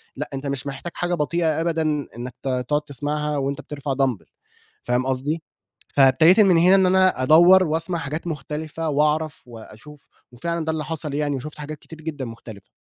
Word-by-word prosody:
لأ، - - -5
أنت 135 +1 -4
مش 140 0 -3
محتاج 140 +5 -6
حاجة 175 0 -1
بطيئة 160 0 0
أبدًا 165 -1 0 0.4
إنَّك 125 0 -6
ت - - -4 0.2
تقعد 150 0 +1
تسمعها 150 +1 -3
وأنت 140 0 -2
بترفع 140 -2 -4
دامبل 130 - -1 0.6
فاهم 125 +1 0
قصدي، 145 +5 -2 0.5
فابتديت 145 +8 +5
من 190 -5 +6
هنا 180 +3 +6
إن 190 -1 +4
أنا 185 -7 +3
أدوّر 175 +5 +6
وأسمع 165 +3 -1
حاجات 160 +3 -5
مختلفة 155 +1 -4
وأعرف 150 +1 0
وأشوف، 120 +5 -13 0.2
وفعلًا 170 +6 -3
ده 160 - 0
اللي 155 -2 -3
حصل 150 -2 -4
يعني 145 -1 -1
وشُفت 150 +4 -7
حاجات 150 0 -7
كتير 160 -1 -13
جدًا 150 -4 -5
مختلفة. 115 -3 -11
150 Hz, 175 wpm, -22 LUFS, 135-165 Hz, 0.6 s, من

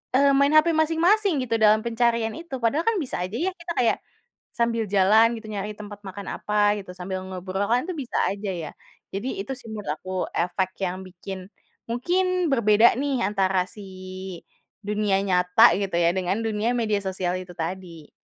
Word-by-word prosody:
eee, 280 +1 +5
main 280 +2 +4
hape 310 +2 +6
masing-masing 330 +1 +3
gitu 230 -2 -1
dalam 215 0 +5
pencarian 235 -1 +1
itu. 335 -4 -7
Padahal 285 - +1
kan 455 - +3
bisa 255 - -4
aja 185 +4 -5
ya 350 +9 0
kita 345 -2 -7
kayak 240 -2 +2 0.6
sambil 230 -1 +1
jalan 210 +4 +5
gitu, 220 -1 -10
nyari 205 0 -4
tempat 205 -1 -9
makan 195 +1 -7
apa 210 0 +2
gitu, 190 -2 -9
sambil 185 +1 -4
ngobrol 190 +1 -3
kan 250 +4 +2
itu - - -1
bisa - - -4
aja 200 0 -3
ya. 165 -4 -5 0.4
Jadi 200 +2 -3
itu 205 - -6
sih 245 - -12
menurut 210 -7 -6
aku 185 - -8 0.2
efek 185 +2 -1
yang 185 +1 -4
bikin, 185 +1 -8 0.4
mungkin 360 +8 +1
berbeda 220 -2 +5
nih 275 -3 0
antara 190 -2 +1
si 210 - -10 1.0
dunia 210 -1 +1
nyata 180 +4 +5
gitu 195 -3 -2
ya 170 0 +4
dengan 190 +3 0
dunia 220 +1 0
media 215 -3 +1
sosial 185 -2 -2
itu 180 -1 -11
tadi. 165 -2 -6
210 Hz, 175 wpm, -24 LUFS, 190-250 Hz, 1.0 s, hape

